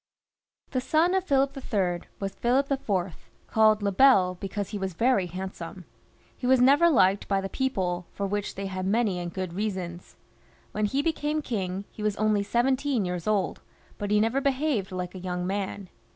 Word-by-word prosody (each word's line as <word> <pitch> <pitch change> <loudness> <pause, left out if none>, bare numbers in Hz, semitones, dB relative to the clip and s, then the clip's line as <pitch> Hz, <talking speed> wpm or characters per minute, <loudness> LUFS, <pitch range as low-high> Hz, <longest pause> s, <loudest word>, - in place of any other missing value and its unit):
The 255 - 0
son 320 +7 +2
of 380 -1 +1
Philip 275 -3 +2
III. 190 -9 -2
was 195 -1 -3
Philip 265 +6 +1
IV., 195 - -2 0.2
called 215 -1 +3
Le 200 - +1
Bel 195 -5 +5
be 185 +2 -6
cause 200 0 -4
he 205 - -4
was 190 -3 -3
very 230 -3 +2
handsome. 185 0 -7 0.5
He 250 - -4
was 260 0 +5
never 280 +7 +6
Uked 195 - +3
by 195 -1 +1
the 195 - -3
people, 185 -10 -1
for 200 - -3
which 205 +1 -3
they 195 - -4
had 185 -1 -3
many 205 -3 +1
and 175 -1 -4
good 185 -1 -4
reasons. 185 -3 -4 0.6
When 215 0 0
he 270 +7 0
became 305 -1 -1
king, 195 -5 -3
he - - -10
was 210 -1 0
only 215 -1 +2
seventeen 255 +2 +1
years 180 0 -4
old, 210 -3 0 0.4
but 205 -1 -3
he 210 0 +4
never 225 +6 +1
behaved 270 -7 0
like 180 -1 -4
a 185 - -7
young 180 -1 -3
man. 195 0 -3
205 Hz, 185 wpm, -27 LUFS, 185-255 Hz, 0.6 s, never